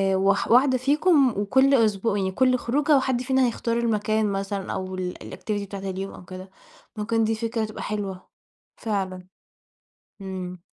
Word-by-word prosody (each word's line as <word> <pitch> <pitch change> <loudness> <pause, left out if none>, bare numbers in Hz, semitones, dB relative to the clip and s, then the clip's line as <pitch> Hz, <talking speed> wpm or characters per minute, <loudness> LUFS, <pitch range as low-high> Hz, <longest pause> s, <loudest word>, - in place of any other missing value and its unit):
واح 195 +1 +1
واحدة 255 +2 +5
فيكم 285 +2 +3
وكل 265 +7 +3
أسبو 220 -3 +2
يعني 190 -2 0
كل 255 +4 +3
خروجة 285 +5 +2
وحد 260 -2 0
فينا 260 0 +2
هيختار 230 0 -2
المكان 220 -2 +1
مثلًا 195 0 -3
أو 185 0 -4
ال 180 -1 -3
الactivity 210 -2 -4
بتاعة 200 0 -7
اليوم 190 +1 -5
أو 180 - -12
كده، 185 +1 -9 0.5
ممكن 225 +2 0
دي 220 +1 +1
فكرة 225 0 -2
تبقى 215 - -7
حلوة 200 -3 -4 0.5
فعلًا. 190 -4 -3 0.9
إمم. 185 -2 -6
215 Hz, 150 wpm, -24 LUFS, 195-250 Hz, 0.9 s, واحدة